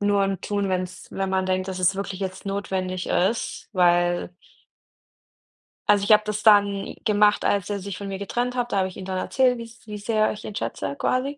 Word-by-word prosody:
nur 205 Hz, -1 st, +3 dB
im 195 Hz, -2 st, -2 dB
Tun, 200 Hz, -1 st, -1 dB
wenn's 185 Hz, 0 st, -3 dB
wenn 195 Hz, 0 st, -2 dB
man 190 Hz, 0 st, +1 dB
denkt, 185 Hz, 0 st, 0 dB
dass 185 Hz, -1 st, -4 dB
es 185 Hz, +1 st, +3 dB
wirklich 195 Hz, -1 st, -5 dB
jetzt 190 Hz, +1 st, -5 dB
notwendig 190 Hz, -2 st, -2 dB
ist, 200 Hz, +6 st, 0 dB
weil 175 Hz, -1 st, +2 dB, 1.6 s
Also, 205 Hz, -1 st, +5 dB
ich 205 Hz, -, +1 dB
habe 210 Hz, 0 st, +7 dB
das 210 Hz, 0 st, -3 dB
dann 205 Hz, -2 st, +4 dB
gemacht, 210 Hz, -1 st, +4 dB
als 200 Hz, -1 st, +1 dB
er 205 Hz, -1 st, -2 dB
sich 190 Hz, -1 st, -6 dB
von 200 Hz, -, -6 dB
mir 195 Hz, -1 st, -4 dB
getrennt 245 Hz, +5 st, -2 dB
hat. 245 Hz, -1 st, -1 dB
Da -, -, +1 dB
habe 190 Hz, -1 st, +2 dB
ich 185 Hz, -, -10 dB
ihm 190 Hz, -, -7 dB
dann 190 Hz, -1 st, -3 dB
erzählt, 250 Hz, +5 st, +2 dB
wie's 230 Hz, 0 st, -11 dB
wie 210 Hz, 0 st, -5 dB
sehr 215 Hz, +1 st, +1 dB
ich 210 Hz, -, -8 dB
ihn 205 Hz, -, -7 dB
schätze 140 Hz, -, -3 dB
quasi. 275 Hz, -, -1 dB
200 Hz, 210 wpm, -24 LUFS, 185-210 Hz, 1.6 s, habe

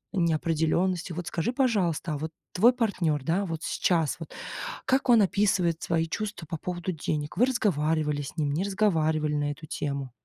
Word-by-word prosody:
неопределенности. 170 Hz, +1 st, +1 dB
Вот 175 Hz, +1 st, -5 dB
скажи, 175 Hz, +9 st, -1 dB
пожалуйста, 195 Hz, -, +1 dB
а -, -, -2 dB
вот 160 Hz, +2 st, -4 dB, 0.2 s
твой 230 Hz, +7 st, +6 dB
партнер, 185 Hz, -, 0 dB
да, 175 Hz, +7 st, +1 dB
вот 165 Hz, -1 st, -4 dB
сейчас 165 Hz, -5 st, +1 dB
вот 165 Hz, -, -8 dB, 0.5 s
как 265 Hz, 0 st, +1 dB
он 230 Hz, -3 st, +7 dB
описывает 185 Hz, -4 st, +1 dB
свои 165 Hz, -1 st, +1 dB
чувства 205 Hz, -1 st, -4 dB
по 165 Hz, -, -4 dB
поводу 175 Hz, +2 st, -3 dB
денег? 150 Hz, +1 st, -3 dB
Вы 245 Hz, -, +6 dB
разговаривали 155 Hz, -, +1 dB
с 140 Hz, -, -8 dB
ним, 145 Hz, -2 st, 0 dB
не 170 Hz, -, 0 dB
разговаривали 160 Hz, -7 st, +1 dB
на 145 Hz, 0 st, 0 dB
эту 155 Hz, +2 st, -9 dB
тему? 140 Hz, -3 st, -3 dB
165 Hz, 170 wpm, -27 LUFS, 155-195 Hz, 0.5 s, он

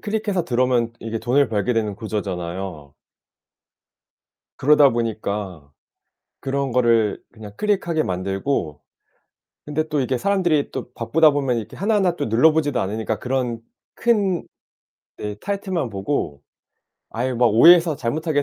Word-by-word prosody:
클릭해서 205 Hz, -4 st, -2 dB
들어오면 120 Hz, -2 st, +1 dB
이게 115 Hz, 0 st, -4 dB
돈을 125 Hz, +3 st, +2 dB
벌게 105 Hz, +2 st, 0 dB
되는 110 Hz, -3 st, -1 dB
구조잖아요. 90 Hz, -7 st, -5 dB, 1.6 s
그러다 145 Hz, 0 st, +5 dB
보니까 100 Hz, -, -4 dB, 0.7 s
그런 135 Hz, -1 st, -2 dB
거를 115 Hz, -4 st, +2 dB
그냥 105 Hz, -2 st, -11 dB
클릭하게 180 Hz, -6 st, 0 dB
만들고 95 Hz, -, -2 dB, 0.8 s
근데 155 Hz, +2 st, -2 dB
또 150 Hz, -2 st, -1 dB
이게 130 Hz, 0 st, -1 dB
사람들이 175 Hz, -5 st, +1 dB
또 125 Hz, -2 st, -6 dB
바쁘다 150 Hz, +8 st, +3 dB
보면 135 Hz, -4 st, 0 dB
이렇게 110 Hz, -1 st, -6 dB
하나하나 195 Hz, -3 st, +1 dB
또 -, -, -3 dB
눌러보지도 145 Hz, +3 st, +3 dB
않으니까 110 Hz, +2 st, -3 dB
그런 125 Hz, -3 st, -2 dB, 0.3 s
큰 205 Hz, -7 st, +1 dB, 0.7 s
네 105 Hz, -1 st, -5 dB
타이틀만 190 Hz, -, -3 dB
보고 95 Hz, -, -3 dB, 0.7 s
아예 125 Hz, +3 st, -2 dB
막 120 Hz, 0 st, +3 dB
오해해서 165 Hz, +7 st, +6 dB
잘못하게 145 Hz, +4 st, -1 dB
125 Hz, 305 characters per minute, -21 LUFS, 105-155 Hz, 1.6 s, 오해해서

